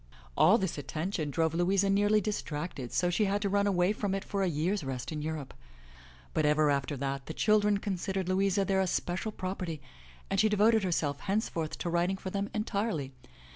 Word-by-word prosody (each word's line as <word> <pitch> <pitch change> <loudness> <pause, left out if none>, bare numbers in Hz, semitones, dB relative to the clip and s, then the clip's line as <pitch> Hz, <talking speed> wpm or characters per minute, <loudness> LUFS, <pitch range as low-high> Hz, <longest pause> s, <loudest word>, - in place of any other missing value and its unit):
All 190 +8 +6
this 190 -7 -2
attention 155 +2 -3
drove 160 +2 0
Louisa 190 +4 +2
nearly 205 +2 +3
distracted, 155 - -4
so 175 -1 +1
she 210 +4 +2
had 200 +1 +1
to 200 - +1
run 200 +1 +2
away 185 0 +2
from 205 -2 -2
it 195 - -3
for 200 - -2
a 190 - +2
year's 175 +4 0
rest 130 -1 -4
in 150 -1 -3
Europe. 155 -3 -4 0.8
But 155 - +1
ever 150 0 +3
after 140 +1 -1
that 135 0 -3
the 160 - -6
children 210 -1 +3
considered 190 -1 -2
Louisa 195 +1 +2
their 190 0 +2
especial 185 +2 -1
property 185 -5 -4 0.5
and 195 - 0
she 215 - +4
devoted 215 +2 +4
herself 150 -6 0
henceforth 190 - -2
to 175 - -3
writing 175 +3 +1
for 190 0 -6
them 200 +1 -2
entirely. 205 - -2
185 Hz, 185 wpm, -30 LUFS, 155-200 Hz, 0.8 s, All